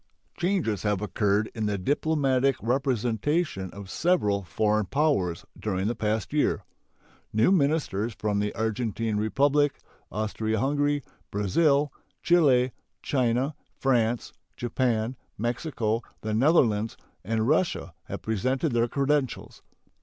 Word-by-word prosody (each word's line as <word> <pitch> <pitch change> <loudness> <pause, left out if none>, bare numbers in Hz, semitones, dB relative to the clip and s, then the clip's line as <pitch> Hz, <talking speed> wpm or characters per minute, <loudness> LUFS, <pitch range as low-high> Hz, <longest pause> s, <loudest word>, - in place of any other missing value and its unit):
Changes 175 - 0
have 105 -2 0
occurred 105 +1 0
in 110 -3 -2
the 105 -1 0
diplomatic 135 +2 +1
representation 125 - 0
of 100 +1 -9
several 105 - +1
foreign 105 +3 0
powers 100 - +1
during 95 -3 -1
the 115 - +1
past 110 +2 -2
year. 145 -8 +1 0.7
New 110 - +3
ministers 140 - +1
from 105 -1 0
the 105 0 0
Argentine 110 0 -1
Republic, 140 +7 +2 0.3
Austria 110 +1 -1
Hungary, 145 +2 +1 0.3
Brazil, 140 - +2 0.3
Chile, 135 -8 +4 0.3
China, 130 +2 +1 0.3
France, 120 -3 +1 0.2
Japan, 120 -1 0 0.2
Mexico, 120 -1 -1 0.2
the 110 0 -2
Netherlands, 115 -4 +3 0.3
and 110 +2 0
Russia 155 - +1
have 100 - -6
presented 130 - 0
their 120 0 +2
credentials. 140 0 -1
115 Hz, 110 wpm, -27 LUFS, 105-140 Hz, 0.7 s, Chile